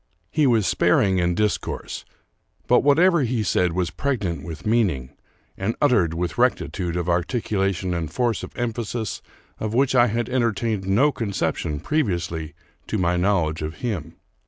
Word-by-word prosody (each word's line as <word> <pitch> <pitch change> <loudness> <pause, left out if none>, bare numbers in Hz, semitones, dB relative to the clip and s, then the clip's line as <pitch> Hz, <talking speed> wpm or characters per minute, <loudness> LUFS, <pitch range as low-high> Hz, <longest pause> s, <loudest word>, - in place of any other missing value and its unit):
He 155 -3 +3
was 115 -5 +3
sparing 95 +2 +3
in 85 0 +1
discourse; 105 +2 -2 0.6
but - - +5
whatever 170 +4 +4
he 120 -3 0
said 90 -3 +1
was 90 -1 -1
pregnant 105 -12 -2
with 80 -3 -8
meaning, 95 - +1 0.4
and 100 +4 -2
uttered 100 - +3
with 85 -1 -3
rectitude 85 -2 0
of 90 - -1
articu 95 +5 -1
lation 95 -2 0
and 80 -3 -3
force 120 -3 0
of - - -9
emphasis 115 -2 -3 0.4
of 110 +1 -3
which 135 +1 +3
I 120 -1 +5
had 115 +1 -1
entertained 115 -5 0
no 120 +10 +4
conception 100 - -2
previously 85 - -2 0.3
to - - -1
my 90 -1 +1
knowledge 90 -4 +1
of 80 +1 -4
him. 85 -9 -3
100 Hz, 155 wpm, -23 LUFS, 85-120 Hz, 0.6 s, but